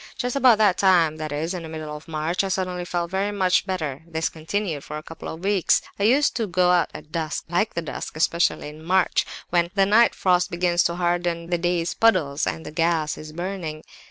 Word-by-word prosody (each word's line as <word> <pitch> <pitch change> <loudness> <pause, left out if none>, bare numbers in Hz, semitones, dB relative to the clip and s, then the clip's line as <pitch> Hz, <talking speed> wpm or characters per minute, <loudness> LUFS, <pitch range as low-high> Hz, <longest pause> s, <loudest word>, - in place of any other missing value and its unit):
"Just 245 0 -2
about 255 -5 +5
that 205 -4 +3
time, 170 -5 +4
that 155 -1 -5
is, 155 +3 -2
the 185 - -3
middle 155 -2 -6
of 150 +2 -11
March, 160 +4 -1
I - - -1
suddenly 180 -1 -2
felt 175 -1 -3
very 195 +2 0
much 190 -1 +1
better; 155 -7 -3
this 160 -1 -1
continued 160 -1 -3
for 150 - -6
a 155 - -8
couple 165 - -9
of 160 +3 -8
weeks. 195 -2 +3 0.2
I - - 0
used 275 +6 +3
to 225 -3 -1
go 180 0 +3
out 175 -3 +3
at 155 - -11
dusk. 160 -2 -3
I - - -10
like 215 - 0
the 170 - -2
dusk, 155 - -6
especially 165 -1 +1
in 155 +1 -12
March, 185 +2 +2 0.2
when 170 -1 +2
the 195 -1 +4
night 220 +4 +4
frost 180 -1 +2
begins 175 0 +1
to 170 - 0
harden 175 -1 -1
the 175 - +1
day's 175 -1 0
puddles, 170 -11 +2
and 160 - -3
the - - -7
gas 165 -1 0
is 155 0 -9
burning. 170 -2 -5
175 Hz, 220 wpm, -23 LUFS, 160-190 Hz, 0.2 s, about